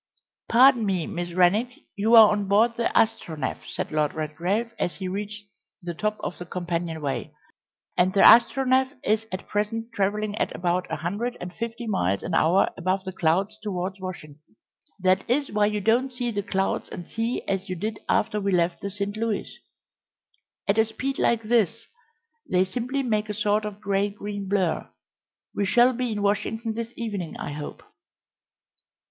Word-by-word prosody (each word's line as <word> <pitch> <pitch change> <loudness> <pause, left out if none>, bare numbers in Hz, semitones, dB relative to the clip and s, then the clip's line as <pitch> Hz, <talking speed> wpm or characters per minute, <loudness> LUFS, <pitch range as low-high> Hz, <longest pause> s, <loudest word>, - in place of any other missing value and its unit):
"Pardon 245 0 +6
me, 190 -5 0
Miss 175 -4 -4
Rennick, 185 +7 +4 0.3
you 220 +3 +4
are 220 -2 +9
on 205 -1 -1
board 220 +4 +3
the 235 - 0
Astronef," 170 -11 0
said - - -4
Lord 150 -1 0
Redgrave, 175 +9 -2
as 175 - -1
he 185 +4 -5
reached 205 +2 -5 0.4
the 175 -2 -5
top 215 +5 -2
of - - -5
the 175 - -6
companion 170 -2 -3
way, 135 -5 -3 0.6
"and 180 +1 +3
the 195 - +3
Astronef 260 +3 +6
is 220 +1 +1
at 185 +1 -5
present 225 +3 -2
travelling 205 +1 -1
at - - -1
about 180 +1 0
a - - 0
hundred 205 +10 -3
and 180 0 -7
fifty 230 +2 -5
miles 100 - 0
an 175 - -4
hour 170 +4 +4
above 185 +1 0
the 190 - -5
clouds 190 +6 0
towards 190 -2 -3
Washington. 155 -5 -8 0.6
That 185 0 +3
is 280 +3 +1
why 210 0 +3
you 210 0 -1
don't 240 +6 +2
see 245 -1 -3
the 205 -2 -1
clouds 195 -1 -1
and 175 - -7
sea 230 +2 -2
as 195 -1 -2
you 185 - -2
did 210 +4 -4
after 210 -1 +1
we 200 0 0
left 170 -1 +1
the 200 - -3
St. 200 +1 -4
Louis. 220 -1 -2 1.1
At 200 +2 +2
a 220 - +5
speed 260 +5 -4
like 230 -1 +2
this 225 0 +1 0.6
they 185 0 +3
simply 250 +7 -2
make 215 -3 0
a 210 - -3
sort 210 +1 +1
of 210 -1 -6
grey 200 0 0
green 205 -1 -6
blur. 190 -5 0 0.6
We 200 - 0
shall 245 +6 +5
be 250 -1 -2
in 205 -1 -2
Washington 220 +3 0
this 230 +1 -5
evening, 205 -8 -4
I - - -5
hope." 145 0 -7
205 Hz, 175 wpm, -25 LUFS, 185-225 Hz, 1.1 s, are